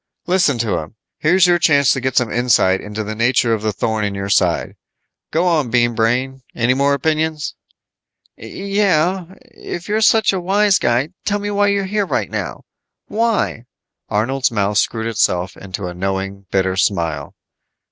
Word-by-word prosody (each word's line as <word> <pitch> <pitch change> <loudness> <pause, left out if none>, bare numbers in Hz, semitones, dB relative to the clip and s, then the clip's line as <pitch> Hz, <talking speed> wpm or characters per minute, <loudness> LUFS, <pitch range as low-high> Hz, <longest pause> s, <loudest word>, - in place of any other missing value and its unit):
"Listen 175 -7 +2
to 110 -6 -1
him. 80 +7 -9 0.2
Here's 180 +4 +4
your 175 -1 +3
chance 140 -5 +4
to 135 - +1
get 130 0 -2
some 125 -3 +2
insight 115 -6 +2
into 105 +1 -5
the 105 +1 -5
nature 115 +1 +2
of 110 - -1
the 110 0 0
thorn 110 +2 -2
in 100 -1 -2
your 100 0 -4
side. - - +1 0.5
Go 165 +3 0
on, 155 -8 +1
Bean 120 0 +2
Brain. 125 +4 0
Any 120 +2 +2
more 140 +2 +2
opinions?" 155 0 -1 0.8
"Yeah. 190 -3 0 0.2
If 175 - -8
you're 215 +1 0
such 220 -1 +4
a 190 - -2
wise 200 +2 +3
guy, 120 +5 +1
tell 205 - 0
me 205 0 -4
why 205 0 +2
you're 200 -1 +1
here 205 0 -1
right - - -2
now. - - -4 0.5
Why?" 220 - 0 0.4
Arnold's 125 +5 0
mouth 105 -2 0
screwed 110 -1 -1
itself 95 -5 0
into 100 0 -7
a 90 - -5
knowing, 95 +1 -4
bitter 95 -1 0
smile. 85 -7 -1
125 Hz, 165 wpm, -18 LUFS, -, 0.8 s, Here's